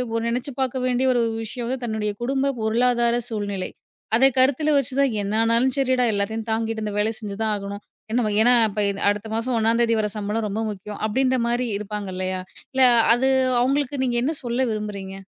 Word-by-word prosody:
ஒரு 230 - 0
நெனைச்சு 245 +4 -2
பாக்க 260 0 -1
வேண்டிய 255 +1 +1
ஒரு 240 - +2 0.2
விஷயம் 235 +2 -6
வந்து, 260 +1 -3
தன்னுடைய 220 -2 -2
குடும்ப 275 +2 0
பொருளாதார 235 +1 +2
சூழ்நிலை. 205 -4 -3 0.5
அதை 265 +4 +6
கருத்தில 285 +4 +3
வச்சு 275 -1 -1
தான் 275 -4 +3
"என்னானாலும் 230 +5 +2
சரிடா, 260 -2 +2
எல்லாத்தையும் 220 +3 -2
தாங்கிட்டு 225 0 -1
இந்த 210 - -3
வேலை 220 +2 +1
செஞ்சுதான் 215 0 -2
ஆகணும்" 200 0 -6 0.3
என்ன 240 - +1
வகை 210 0 -1
ஏன்னா, 245 +2 +6 0.2
இப்ப 210 +1 -2
இது 200 - -4
அடுத்த 205 +1 -2
மாசம் 240 +2 -1
1 225 +1 +2
தேதி 230 -1 +2
வர 210 - +1
சம்பளம் 210 +2 -2
ரொம்ப 205 - -3
முக்கியம். 205 0 -7
அப்டின்ற 260 +3 +1
மாரி 240 +1 0
இருப்பாங்க 210 -1 -5
இல்லையா? 185 0 -2 0.3
இல்ல 265 - +1 0.3
அது 265 +2 +1 0.3
அவுங்களுக்கு 275 +1 0
நீங்க 240 -1 0
என்ன 305 - 0
சொல்ல 245 +2 0
விரும்புறீங்க? 205 -3 -5
230 Hz, 185 wpm, -23 LUFS, 210-255 Hz, 0.5 s, அதை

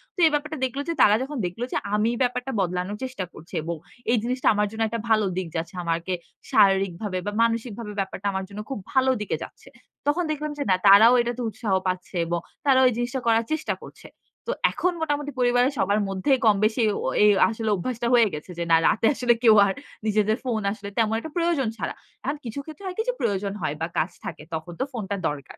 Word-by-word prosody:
তো - - -9
এই 315 - +5
ব্যাপারটা 310 +1 -2
দেখল 260 +2 -4
যে, - - +1
তারা 210 - +7
যখন 285 +2 -6
দেখল 180 +6 -5
যে - - 0 0.2
আমি 215 +2 +2
ব্যাপারটা 250 +1 -2
বদলানোর 180 +2 -1
চেষ্টা 255 -7 -4
করছি 165 +5 -14
এবং 170 +1 -3 0.4
এই 240 - +4
জিনিসটা 250 +1 -1
আমার 210 0 +1
জন্য 225 0 -5
একটা 230 +1 -3
ভালো 215 -2 +4
দিক 185 -2 -2
যাচ্ছে, 170 +4 -4
আমাকে 170 +2 -1 0.4
শারীরিকভাবে 195 0 +3
বা, 205 - -1
মানসিকভাবে 230 -1 -2
ব্যাপারটা 195 +1 -3
আমার 190 0 -2
জন্য 205 +1 -8
খুব 270 - -4
ভালো 260 0 +4
দিকে 210 - -1
যাচ্ছে, - - -13 0.4
তখন 315 +5 +2
দেখলাম 305 0 -3
যে 285 - -1
না, 185 - +5
তারাও 210 +5 +9
এটাতে 240 +1 -3
উৎসাহ 220 0 -4 0.2
পাচ্ছে 185 +1 -3
এবং 170 +1 -1 0.3
তারাও 260 -2 +5
এই - - -2
জিনিসটা 240 +2 -2
করার 225 0 +3
চেষ্টা 315 -1 -1
করছে। - - -12 0.4
তো - - 0 0.2
এখন 365 - 0
মোটামুটি 290 -2 -1
পরিবারের 245 +1 +3
সবার 200 +1 +2
মধ্যেই 195 +8 +2
কমবেশি 215 +2 +3 0.2
ও - - 0 0.2
এই 210 - +7 0.2
আসলে 225 -1 -3
অভ্যাসটা 235 +5 -3
হয়ে 235 -2 +6
গেছে 150 +4 -7
যে - - 0
না, - - +8
রাতে 215 - +2
আসলে 245 -2 +3
কেউ 220 -2 +7
আর 195 - 0 0.3
নিজেদের 215 0 +2
ফোন 230 -4 0
আসলে 200 -1 -7
তেমন 220 -1 +2
একটা 315 +6 -8
প্রয়োজন 335 -7 +1
ছাড়া, - - -3 0.3
এখন 290 - -2
কিছু 230 +4 -5
ক্ষেত্রে 315 +4 -11
হয় 370 -1 -4
কি 445 - +1
যে, - - +1
প্রয়োজন 200 0 -1
হয় 155 -2 -1
বা, 165 - 0
কাজ 165 +4 +1
থাকে, - - -6
তখন 160 +2 -5
তো - - +2
ফোনটা 205 -4 -3
দরকার। 145 -2 -6
220 Hz, 210 wpm, -25 LUFS, 195-255 Hz, 0.4 s, তারাও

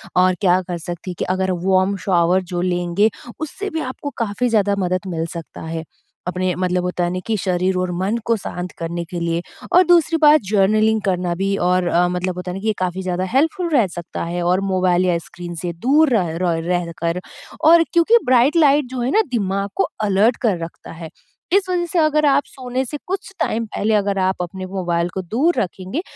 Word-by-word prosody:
और 185 0 +4
क्या 185 -1 +4
कर 175 -1 -3
सकती 175 +2 -6
कि - - 0
अगर 190 0 0
वॉर्म 190 +1 +3
शावर 180 -1 +3
जो 175 - 0
लेंगे, 180 +3 +1 0.3
उससे 385 +7 -4
भी 320 - -3
आपको 260 +2 -5
काफ़ी 230 +2 -1
ज़्यादा 205 -2 +2
मदद 185 0 -1
मिल 165 -3 -2
सकता 170 -2 -8
है। 160 0 -5 0.4
अपने 185 0 -1
मतलब 180 0 0
होता 180 0 -1
है 175 - +1
ना 185 - -2
कि 225 - +1
शरीर 185 0 0
और 180 0 -1
मन 205 +5 0
को 230 - +2
शांत 180 -2 -6
करने 170 +1 -4
के 175 +1 -6
लिए 170 0 -1 0.3
और 360 - +7
दूसरी 340 -2 +4
बात 300 0 +7
जर्नलिंग 215 +2 +3
करना 180 -2 0
भी 195 +2 0
और 180 0 +1
अ, 175 +1 +3
मतलब 180 0 -2
होता 180 0 -5
है - - -6
ना 195 - -7
कि 220 - -3
ये 220 - +2
काफ़ी 185 0 -2
ज़्यादा 185 0 -1
हेल्पफुल 325 +6 +1
रह 230 -8 +4
सकता 175 -1 -6
है 175 +1 -3
और 180 +2 +2
मोबाइल 185 -1 +2
या 175 -2 +2
स्क्रीन 175 -1 -8
से 175 -1 -3
दूर 300 +2 +5
रह 170 -5 -1
रह 170 -2 0
रह 175 -1 -1
कर 170 +1 0 0.5
और 335 0 +7
क्योंकि 340 +8 +5
ब्राइट 255 +4 +4
लाइट 290 -3 +4
जो 255 -1 -3
है 250 +3 0
ना 440 - +4
दिमाग 200 -3 -1
को - - +2 0.2
अलर्ट 210 +4 +3
कर 215 -7 +2
रखता 165 - -9
है। 165 -1 -8 0.4
इस 390 -1 +3
वज़ह 355 -1 0
से 340 0 -1
अगर 305 -1 +3
आप 285 0 +4
सोने 255 0 -4
से 295 - -5
कुछ 385 +1 -4
टाइम 230 +1 0
पहले 215 0 -1
अगर 200 -1 0
आप 190 0 +1
अपने 185 +2 -5
मोबाइल 175 -2 -1
को 190 - -2
दूर 255 - +1
रखेंगे, 190 - -4
190 Hz, 215 wpm, -20 LUFS, 180-245 Hz, 0.5 s, और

